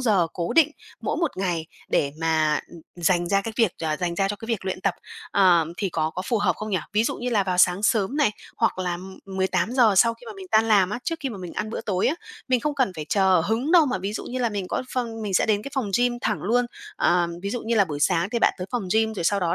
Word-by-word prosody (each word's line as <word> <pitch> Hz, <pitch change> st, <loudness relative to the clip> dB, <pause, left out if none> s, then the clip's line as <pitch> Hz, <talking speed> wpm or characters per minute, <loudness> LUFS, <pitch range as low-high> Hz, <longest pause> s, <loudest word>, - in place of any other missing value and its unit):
giờ 205 Hz, -9 st, +3 dB
cố 170 Hz, -1 st, -3 dB
định 315 Hz, -2 st, +5 dB, 0.3 s
mỗi -, -, -2 dB
một 335 Hz, -5 st, 0 dB
ngày 175 Hz, -4 st, -1 dB, 0.2 s
để 140 Hz, -1 st, +1 dB
mà 155 Hz, -2 st, +2 dB, 0.4 s
dành 175 Hz, 0 st, +1 dB
ra 195 Hz, +1 st, +3 dB
cái 225 Hz, +3 st, -5 dB
việc, 225 Hz, -6 st, +3 dB
ờ, 155 Hz, -1 st, 0 dB
dành 175 Hz, 0 st, -2 dB
ra 195 Hz, +2 st, +1 dB
cho 205 Hz, -, -3 dB
cái 225 Hz, -, -9 dB
việc 225 Hz, -5 st, -2 dB
luyện 185 Hz, -1 st, -3 dB
tập, 195 Hz, -2 st, 0 dB, 0.4 s
ờ, 180 Hz, -4 st, +5 dB
thì 195 Hz, -, -1 dB
có 160 Hz, -2 st, -1 dB
có 185 Hz, -, -5 dB
phù 235 Hz, -, +1 dB
hợp 185 Hz, -5 st, +1 dB
không 215 Hz, 0 st, -5 dB
nhỉ? 190 Hz, -, +1 dB
Ví 215 Hz, +2 st, +2 dB
dụ -, -, -1 dB
như 245 Hz, +1 st, -3 dB
là 210 Hz, -4 st, +3 dB
vào 185 Hz, -1 st, -2 dB
sáng 180 Hz, +2 st, +4 dB
sớm 220 Hz, +2 st, +1 dB
này, 290 Hz, -8 st, +3 dB, 0.3 s
hoặc 230 Hz, -, +1 dB
là, 180 Hz, -1 st, -1 dB
ưm, 190 Hz, +2 st, -9 dB, 0.2 s
18:00 205 Hz, +5 st, +2 dB
sau 230 Hz, +4 st, +5 dB
khi 485 Hz, -, -17 dB
mà 455 Hz, -, -6 dB
mình 380 Hz, -, -9 dB
tan 220 Hz, +1 st, +4 dB
làm 195 Hz, -3 st, +4 dB
á, 225 Hz, -, -2 dB
trước 330 Hz, -1 st, -2 dB
khi 275 Hz, -, -2 dB
mà 220 Hz, -6 st, -7 dB
mình 180 Hz, -2 st, -7 dB
ăn 215 Hz, -, -3 dB
bữa -, -, -4 dB
tối 190 Hz, -3 st, 0 dB
á, 290 Hz, -, +2 dB, 0.3 s
mình 250 Hz, -2 st, +3 dB
không 300 Hz, +2 st, -1 dB
cần 260 Hz, -9 st, +1 dB
phải 155 Hz, -, -4 dB
chờ 190 Hz, -4 st, +3 dB
hứng 235 Hz, -, 0 dB
đâu 335 Hz, -4 st, +7 dB
mà 220 Hz, -, -1 dB
ví 195 Hz, +3 st, -4 dB
dụ -, -, -5 dB
như 255 Hz, -, -4 dB
là 240 Hz, -2 st, +1 dB
mình 200 Hz, -3 st, -4 dB
có -, -, -1 dB
phòng 230 Hz, -3 st, -3 dB
mình 200 Hz, -3 st, -3 dB
sẽ -, -, +3 dB
đến 210 Hz, -1 st, +1 dB
cái 275 Hz, -, -7 dB
phòng 245 Hz, -7 st, -1 dB
gym 245 Hz, 0 st, +1 dB
thẳng 215 Hz, -, -1 dB
luôn. 245 Hz, +5 st, +2 dB, 0.3 s
Ờ, 175 Hz, 0 st, +3 dB, 0.2 s
ví 200 Hz, -, -3 dB
dụ 245 Hz, -, -3 dB
như 230 Hz, +1 st, -1 dB
là 205 Hz, -, +5 dB
buổi 150 Hz, -5 st, -6 dB
sáng 170 Hz, +3 st, +2 dB
thì 235 Hz, -, 0 dB
bạn -, -, +4 dB
tới 180 Hz, -, -4 dB
phòng 245 Hz, -3 st, -1 dB
gym, 220 Hz, 0 st, +2 dB
rồi 175 Hz, -5 st, -4 dB
sau 200 Hz, +3 st, +2 dB
đó 170 Hz, -1 st, +1 dB
200 Hz, 285 wpm, -24 LUFS, 180-235 Hz, 0.4 s, đâu